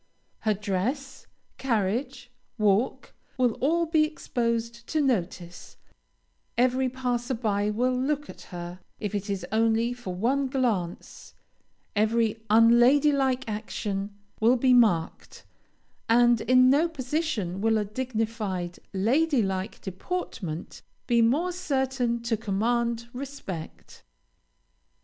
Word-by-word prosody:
Her 215 -1 +1
dress, 245 +8 -3 0.3
carriage, 245 +1 -1 0.3
walk, 210 +2 +1 0.2
will 250 -2 +3
all 335 +5 +2
be 315 -1 +3
exposed 235 -6 -2
to 315 - 0
notice; 180 - -2 0.8
every 255 +1 +2
passer 250 0 -2
by 210 -3 0
will 250 +4 +1
look 290 +3 -1
at - - -11
her, 175 0 -7 0.2
if 210 -2 -4
it 205 0 -3
is 195 -1 -2
only 225 +2 +2
for 240 -7 -6
one 265 +8 +1
glance; 230 -10 -3 0.6
every 220 +1 +1
unlady 240 +6 +6
like 265 -2 0
action 205 -2 -4 0.2
will 235 +4 +4
be 255 +1 +4
marked; 210 -10 +1 0.6
and 240 0 +5
in 255 0 +5
no 310 +5 +3
position 260 - -2
will 225 0 +3
a 210 - 0
dignified, 215 -6 -3 0.2
lady 260 +6 +2
like 190 0 -3
deportment 190 - -5 0.2
be 235 -1 +3
more 290 +11 +2
certain 265 -8 -1
to 235 -1 0
command 235 +3 -1
respect. 250 - -8
235 Hz, 115 wpm, -27 LUFS, 210-260 Hz, 0.8 s, unlady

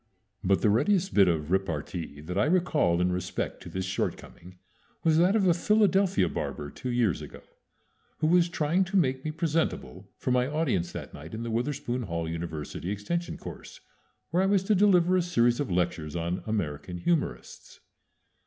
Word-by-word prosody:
But 95 +1 +2
the 110 - +5
readiest 190 - +2
bit 100 -2 +6
of 80 -2 0
repartee 85 -4 -2
that 90 +4 -6
I 100 - +3
recall 155 - +2
in 90 0 +2
respect 90 0 -3
to - - -9
this 95 0 -3
shortcoming 90 -1 -5 0.5
was 160 -1 +4
that 180 +4 +4
of 205 -3 +3
a 175 - +5
Philadelphia 195 - +3
barber 75 -3 -4
two 130 - -6
years 120 -7 +1
ago, - - -10 0.7
who 155 - -1
was 175 +1 +4
trying 170 +2 +1
to 195 +2 -1
make 130 -6 +1
me 155 - -2
presentable 155 - -2
for 125 - -2
my 125 0 +2
audience 140 - 0
that - - -7
night 80 +8 -9
in 115 - -5
the 115 - -4
Witherspoon 125 +1 -2
Hall 85 -6 -3
University 80 +1 -5
extension 105 - -3
course, - - -10 0.5
where 175 +3 +2
I 190 - +2
was 195 -1 +3
to 210 - +2
deliver 185 -3 +4
a - - +3
series 120 -9 +2
of 145 - -1
lectures 85 -3 -1
on 85 +2 -2
American 90 -5 -3
humorists. 85 - -3
120 Hz, 175 wpm, -28 LUFS, -, 0.7 s, bit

